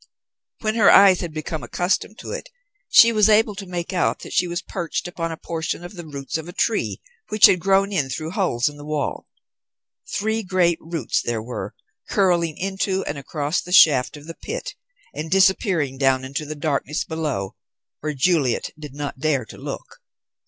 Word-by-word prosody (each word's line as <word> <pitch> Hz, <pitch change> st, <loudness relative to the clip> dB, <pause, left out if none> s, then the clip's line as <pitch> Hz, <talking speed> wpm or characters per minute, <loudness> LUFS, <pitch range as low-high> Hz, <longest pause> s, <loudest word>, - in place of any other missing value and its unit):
When 215 Hz, -1 st, 0 dB
her 220 Hz, -3 st, +5 dB
eyes 195 Hz, -2 st, +7 dB
had 175 Hz, -3 st, -4 dB
become 155 Hz, 0 st, -4 dB
accustomed 195 Hz, +4 st, -1 dB
to -, -, -7 dB
it, -, -, -6 dB, 0.4 s
she 230 Hz, -, +8 dB
was 215 Hz, -1 st, +4 dB
able 215 Hz, 0 st, +4 dB
to 195 Hz, -1 st, -8 dB
make 175 Hz, +1 st, -4 dB
out 180 Hz, -, 0 dB
that -, -, -8 dB
she 180 Hz, -, +2 dB
was 175 Hz, +1 st, -3 dB
perched 175 Hz, -1 st, -4 dB
upon 165 Hz, -2 st, -4 dB
a 160 Hz, -, -6 dB
portion 165 Hz, +1 st, -4 dB
of 175 Hz, -, -9 dB
the 175 Hz, -4 st, -9 dB
roots 140 Hz, +1 st, -4 dB
of 160 Hz, +2 st, -8 dB
a -, -, -9 dB
tree, 220 Hz, +3 st, 0 dB, 0.3 s
which 215 Hz, -1 st, +7 dB
had 180 Hz, -, +5 dB
grown 195 Hz, +2 st, +2 dB
in 145 Hz, -8 st, 0 dB
through 155 Hz, +5 st, -4 dB
holes 180 Hz, -, +1 dB
in 145 Hz, 0 st, -4 dB
the 145 Hz, -, -10 dB
wall. 150 Hz, -1 st, -3 dB, 0.8 s
Three 220 Hz, +2 st, -1 dB
great 180 Hz, -4 st, +1 dB
roots 165 Hz, -6 st, -2 dB
there 115 Hz, -2 st, -2 dB
were, 110 Hz, -4 st, -6 dB, 0.3 s
curling 175 Hz, -5 st, +2 dB
into 190 Hz, 0 st, -1 dB
and 145 Hz, -1 st, -4 dB
across 145 Hz, +3 st, -2 dB
the 180 Hz, -, -10 dB
shaft 150 Hz, -5 st, +5 dB
of 145 Hz, -, -13 dB
the 165 Hz, -, -7 dB
pit -, -, -6 dB, 0.4 s
and 155 Hz, +1 st, -5 dB
disappearing 185 Hz, -7 st, +2 dB
down 130 Hz, -1 st, +2 dB
into 140 Hz, +3 st, -4 dB
the 155 Hz, -, -5 dB
darkness 150 Hz, 0 st, -1 dB
below, 150 Hz, -12 st, -3 dB, 0.4 s
where 150 Hz, -1 st, -3 dB
Juliet 140 Hz, -4 st, +1 dB
did 145 Hz, -3 st, -9 dB
not 145 Hz, -2 st, -5 dB
dare 140 Hz, -5 st, 0 dB
to -, -, -12 dB
look. -, -, -7 dB
165 Hz, 190 wpm, -22 LUFS, 145-190 Hz, 0.8 s, she